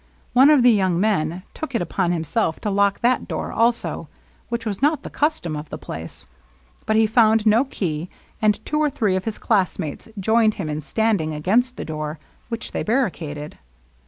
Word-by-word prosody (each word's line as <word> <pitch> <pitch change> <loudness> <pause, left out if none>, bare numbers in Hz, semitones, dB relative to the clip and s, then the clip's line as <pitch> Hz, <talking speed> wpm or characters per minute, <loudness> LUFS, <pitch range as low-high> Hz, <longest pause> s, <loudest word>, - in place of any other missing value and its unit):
One 265 +3 +7
of 295 -5 +5
the 245 - +7
young 190 -5 +2
men 180 -4 0
took 310 -5 -6
it 230 - +1
upon 175 +1 -1
himself 165 +1 -1
to 210 - -1
lock 200 0 +2
that 245 +1 +2
door - - -4
also, 235 +1 0 0.4
which 235 -1 -3
was 205 -1 -3
not 295 0 +2
the - - -8
custom 290 - -1
of 150 0 -7
the - - -6
place; 80 +1 -8 0.6
but 220 - +2
he 220 0 +5
found 220 0 +4
no 225 +5 +4
key, 170 - -3 0.3
and 210 -1 +3
fr^o 300 - -1
or 305 -1 +3
three 215 -9 0
of 185 - -2
his 220 -2 -3
classmates 185 -8 -1
joined 220 +2 +3
him 165 -6 -4
in 150 0 -3
standing 185 -3 0
against 235 +11 +1
the - - -5
door, 155 0 -4 0.3
which 230 -1 -4
they - - -2
barricaded. 165 - -2
210 Hz, 190 wpm, -22 LUFS, 165-235 Hz, 0.6 s, One